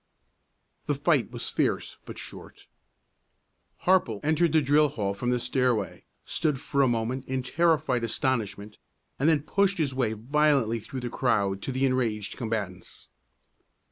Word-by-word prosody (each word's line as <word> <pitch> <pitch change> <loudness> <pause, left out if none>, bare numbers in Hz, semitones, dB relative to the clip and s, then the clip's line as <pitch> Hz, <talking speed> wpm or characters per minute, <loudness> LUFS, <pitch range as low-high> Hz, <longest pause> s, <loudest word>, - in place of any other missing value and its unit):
The - - +1
fight - - +2
was - - -4
fierce - - -1
but - - -9
short. - - -10 1.2
Harple 175 - +3
entered 160 +2 +2
the 160 - +5
drill 150 +2 +4
hall 100 -7 -2
from 120 +5 -3
the 125 - +2
stairway, 120 -4 -1 0.2
stood 150 -5 0
for 140 +1 0
a 135 - +5
moment 120 +2 -1
in 130 -1 -2
terrified 145 -4 +1
astonishment, 110 -4 -2 0.4
and 145 +4 +3
then 150 -3 +2
pushed 200 +3 +1
his 145 -5 0
way 125 -4 0
violently 130 0 +2
through 130 +4 -7
the 120 -1 -4
crowd 100 -6 +1
to 135 - -3
the 130 +1 +1
enraged 115 -6 -1
combatants. 105 -6 -5
130 Hz, 145 wpm, -27 LUFS, 110-145 Hz, 1.2 s, the